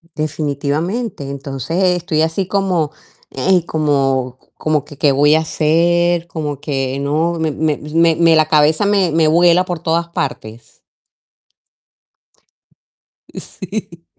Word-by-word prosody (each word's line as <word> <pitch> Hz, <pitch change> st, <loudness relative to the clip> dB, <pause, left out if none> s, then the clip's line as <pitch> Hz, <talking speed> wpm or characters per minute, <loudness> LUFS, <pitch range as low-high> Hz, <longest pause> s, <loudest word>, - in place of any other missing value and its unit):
Definitivamente, 155 Hz, -, -3 dB
entonces 140 Hz, +5 st, -3 dB
estoy 165 Hz, -3 st, -1 dB
así 160 Hz, +4 st, -1 dB
como, 185 Hz, -6 st, 0 dB, 0.4 s
ey, 175 Hz, +5 st, +1 dB
como 135 Hz, -5 st, 0 dB, 0.2 s
como, 155 Hz, -2 st, -1 dB
¿que 145 Hz, -, -12 dB
qué 145 Hz, -, +3 dB
voy 145 Hz, +3 st, +4 dB
a 160 Hz, -, +3 dB
hacer?, 170 Hz, +2 st, +1 dB
como 150 Hz, -4 st, -5 dB
que 135 Hz, -3 st, -2 dB
no 155 Hz, +4 st, 0 dB
me 160 Hz, -1 st, -1 dB
me 155 Hz, 0 st, -1 dB
me 165 Hz, +3 st, +1 dB
me 165 Hz, -1 st, +4 dB
la 155 Hz, -1 st, +3 dB
cabeza 155 Hz, +4 st, +3 dB
me 200 Hz, -4 st, +2 dB
me 160 Hz, 0 st, +2 dB
vuela 175 Hz, +3 st, +4 dB
por 175 Hz, -2 st, -4 dB
todas 170 Hz, +1 st, -1 dB
partes. 120 Hz, -9 st, -6 dB, 2.5 s
Sí. 185 Hz, -3 st, -8 dB
160 Hz, 125 wpm, -17 LUFS, 145-170 Hz, 2.5 s, voy